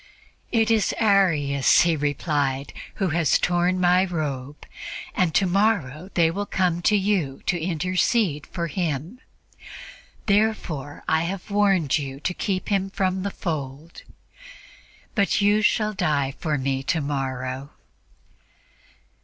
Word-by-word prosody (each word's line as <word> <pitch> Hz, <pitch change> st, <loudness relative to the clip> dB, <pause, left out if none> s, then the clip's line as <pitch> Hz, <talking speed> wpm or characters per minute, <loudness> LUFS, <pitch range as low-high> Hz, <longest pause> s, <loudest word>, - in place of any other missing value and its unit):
"'It 225 Hz, -1 st, +2 dB
is 215 Hz, -5 st, +2 dB
Arius,' 165 Hz, -, +3 dB
He 170 Hz, -2 st, +3 dB
replied, 145 Hz, -2 st, -1 dB, 0.2 s
'who 195 Hz, -3 st, 0 dB
has 160 Hz, -3 st, +2 dB
torn 180 Hz, +1 st, +1 dB
My 180 Hz, +1 st, +4 dB
robe, 150 Hz, -6 st, -4 dB, 0.5 s
and 180 Hz, -3 st, +1 dB
tomorrow 185 Hz, -, +1 dB
they 165 Hz, -2 st, +4 dB
will 200 Hz, +3 st, -3 dB
come 175 Hz, -2 st, 0 dB
to 210 Hz, -, +3 dB
you 190 Hz, -9 st, 0 dB
to 175 Hz, -3 st, 0 dB
intercede 180 Hz, -, 0 dB
for 170 Hz, -2 st, -3 dB
him. 165 Hz, -, -3 dB, 1.1 s
Therefore 200 Hz, -9 st, 0 dB
I 160 Hz, +1 st, +2 dB
have 195 Hz, +3 st, -5 dB
warned 195 Hz, -8 st, +2 dB
you 135 Hz, -1 st, -6 dB
to 180 Hz, +5 st, -2 dB
keep 185 Hz, 0 st, -2 dB
him 195 Hz, -2 st, 0 dB
from 190 Hz, -1 st, -1 dB
the 200 Hz, -, -2 dB
fold. 155 Hz, -3 st, -5 dB, 1.1 s
But 200 Hz, -1 st, +2 dB
you 205 Hz, +1 st, +3 dB
shall 215 Hz, 0 st, +2 dB
die 150 Hz, -8 st, 0 dB
for 155 Hz, -3 st, -1 dB
Me 135 Hz, 0 st, -1 dB
tomorrow.'" 135 Hz, -2 st, -3 dB
175 Hz, 120 wpm, -24 LUFS, 145-195 Hz, 1.1 s, My